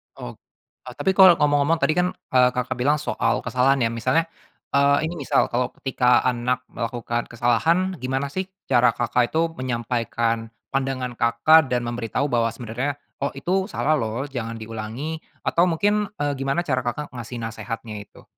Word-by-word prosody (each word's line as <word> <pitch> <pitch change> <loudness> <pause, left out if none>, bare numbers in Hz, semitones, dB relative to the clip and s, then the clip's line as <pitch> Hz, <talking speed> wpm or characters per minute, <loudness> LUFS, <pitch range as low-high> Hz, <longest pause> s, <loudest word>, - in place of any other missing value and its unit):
Ok - - -7 0.6
oh 125 - -7
tapi 190 - +1
kalau 190 -3 +8
ngomong-ngomong 145 +1 +2
tadi 140 - +4
kan, 180 - +3 0.2
eee, 125 -1 +5
Kakak 125 0 -2
bilang 145 +4 +3
soal 150 - -1
kesalahan 130 +2 +2
ya 115 - +1
misalnya, 130 +8 +1 0.5
eee, 140 +1 +3
ini 165 +1 -3
misal 140 - +1
kalau 125 +1 +1
ketika 125 -2 +2
anak 125 0 0
melakukan 120 0 -3
kesalahan 130 +11 +1
gimana 135 +2 -2
sih 190 +4 -3 0.2
cara 120 -2 +4
Kakak 120 0 +1
itu 165 0 +2
menyampaikan 115 -2 -1 0.2
pandangan 135 -2 -1
Kakak 125 +7 +5
dan 125 -1 -1
memberitahu 120 +4 -2
bahwa 115 -1 +2
sebenarnya 125 +5 -3 0.2
oh 140 0 -2
itu 185 +7 -1
salah 155 -7 0
loh 115 +4 -2
jangan 115 -3 -4
diulangi 115 +8 -5 0.2
atau 170 +2 +3
mungkin, 205 +5 +1 0.2
eee, 145 - +1
gimana 135 +5 0
cara 130 -6 0
Kakak 130 +4 -4
ngasih 120 0 -7
nasihatnya 110 -1 -6
itu. 100 - -14
125 Hz, 160 wpm, -23 LUFS, 120-145 Hz, 0.6 s, kalau